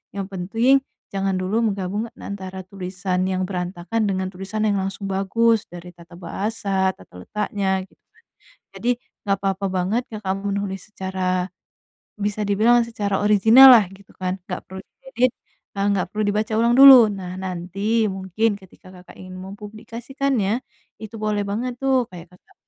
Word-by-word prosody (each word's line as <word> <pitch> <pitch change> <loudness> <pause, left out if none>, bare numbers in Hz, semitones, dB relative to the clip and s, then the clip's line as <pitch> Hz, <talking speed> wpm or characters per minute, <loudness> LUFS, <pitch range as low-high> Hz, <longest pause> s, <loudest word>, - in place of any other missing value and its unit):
Yang 200 -1 -3
penting, 215 +8 +1 0.4
jangan 195 -1 0
dulu 200 +5 0
menggabung, 205 +1 -2
antara 190 -1 -7
tulisan 185 -1 -3
yang 185 0 -1
berantakan 180 +3 -3
dengan 190 -2 -1
tulisan 195 +3 -4
yang 205 - +2
langsung 195 +1 -4
bagus, 205 +4 +2
dari 175 0 -10
tata 170 0 -15
bahasa, 195 +1 -1
tata 90 -1 -14
letaknya, 200 - -1
gitu - - -30
kan. - - -28 0.5
Jadi, 240 - -2 0.3
nggak 200 -1 +1
apa-apa 195 0 -1
banget, 190 +6 0
Kakak 205 -3 -3
menulis 200 0 -4
secara, 185 -2 -2 0.7
bisa 210 +1 -2
dibilang 230 +4 +4
secara 205 -4 -2
original 220 +6 +8
lah, 215 -4 +5
gitu 195 0 -17
kan. 185 0 -3
Nggak 180 - -4
perlu 190 0 -8 0.2
diedit, 380 - +1 0.5
nah, 200 - 0
nggak 195 -2 0
perlu 215 0 -2
dibaca 215 +2 -1
ulang 235 +1 +3
dulu. 265 -4 +10
Nah, 185 -2 -6
nanti, 190 +5 -1
mungkin 190 +3 -1
ketika 190 0 -17
Kakak 180 0 -15
ingin 185 0 -9
mempublikasikannya, 220 +4 -3 0.4
itu 220 +1 -9
boleh 210 -1 0
banget 240 +5 -3
tuh, 265 -2 +2
kayak 180 0 -12
Kakak, 180 - -23
200 Hz, 150 wpm, -22 LUFS, 185-220 Hz, 0.7 s, dulu